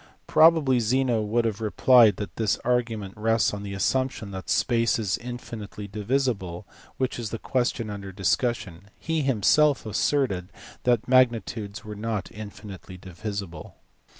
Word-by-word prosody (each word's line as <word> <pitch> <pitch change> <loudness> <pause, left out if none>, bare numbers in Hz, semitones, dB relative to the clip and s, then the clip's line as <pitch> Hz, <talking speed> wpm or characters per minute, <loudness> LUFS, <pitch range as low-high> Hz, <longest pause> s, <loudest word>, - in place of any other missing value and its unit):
Probably 155 -6 +5
Zeno 120 0 +1
would 115 +3 0
have 110 -1 -2
replied 110 0 +5
that 105 - -6
this 110 -3 +1
argument 115 -5 -1
rests 115 0 +1
on 100 - -5
the 100 -1 -6
assumption 130 0 -1
that 95 -1 -7
space 115 -1 +2
is 105 -4 0
infinitely 115 -4 -7
divisible, 105 -4 -2 0.3
which 130 -2 -2
is 115 -3 -4
the 115 - -4
question 120 -3 -1
under 100 -1 -7
discussion; 95 -1 -1
he 160 -1 -1
himself 135 +2 +3
asserted 110 -5 0 0.3
that 120 -3 +2
magnitudes 115 -5 +1
were 105 - -6
not 105 -1 -4
infinitely 100 -3 -10
divisible. 95 -2 -7
110 Hz, 135 wpm, -25 LUFS, 100-125 Hz, 0.3 s, Probably